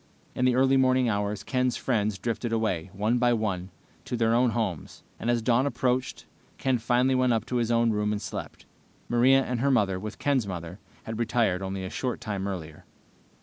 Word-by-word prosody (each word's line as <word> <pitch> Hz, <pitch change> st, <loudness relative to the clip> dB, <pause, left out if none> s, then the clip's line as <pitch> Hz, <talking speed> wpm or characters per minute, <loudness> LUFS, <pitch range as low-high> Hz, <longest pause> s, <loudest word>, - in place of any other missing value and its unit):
In 125 Hz, -, 0 dB
the 125 Hz, -1 st, +3 dB
early 135 Hz, +1 st, +4 dB
morning 130 Hz, -1 st, +3 dB
hours 100 Hz, -1 st, -2 dB
Ken's 125 Hz, +2 st, 0 dB
friends 105 Hz, -5 st, 0 dB
drifted 115 Hz, +3 st, -3 dB
away, 110 Hz, -6 st, -1 dB
one 105 Hz, +5 st, 0 dB
by 120 Hz, 0 st, +3 dB
one, 100 Hz, -5 st, -2 dB, 0.4 s
to 125 Hz, -, -3 dB
their 115 Hz, 0 st, +2 dB
own 125 Hz, +1 st, +4 dB
homes, 110 Hz, -8 st, -3 dB, 0.2 s
and 120 Hz, -, -2 dB
as 120 Hz, -1 st, +1 dB
dawn 125 Hz, +4 st, +3 dB
approached, 130 Hz, -2 st, -1 dB, 0.3 s
Ken 130 Hz, -2 st, +1 dB
finally 125 Hz, +3 st, +2 dB
went 130 Hz, -1 st, +3 dB
up 110 Hz, -1 st, -1 dB
to 125 Hz, -, -2 dB
his 120 Hz, -1 st, 0 dB
own 115 Hz, -1 st, +3 dB
room 105 Hz, 0 st, 0 dB
and 105 Hz, -, -1 dB
slept. -, -, -7 dB, 0.4 s
Maria 130 Hz, +3 st, +4 dB
and 125 Hz, -2 st, -3 dB
her 140 Hz, +3 st, +2 dB
mother, 100 Hz, -8 st, +2 dB
with 105 Hz, +2 st, -7 dB
Ken's 135 Hz, -7 st, +1 dB
mother, 90 Hz, 0 st, -6 dB, 0.2 s
had 110 Hz, 0 st, -6 dB
retired 115 Hz, -6 st, +1 dB
only 95 Hz, 0 st, -4 dB
a 95 Hz, -, -6 dB
short 125 Hz, -2 st, -3 dB
time 100 Hz, -2 st, -3 dB
earlier. 80 Hz, -6 st, -6 dB
115 Hz, 195 wpm, -27 LUFS, 100-125 Hz, 0.4 s, early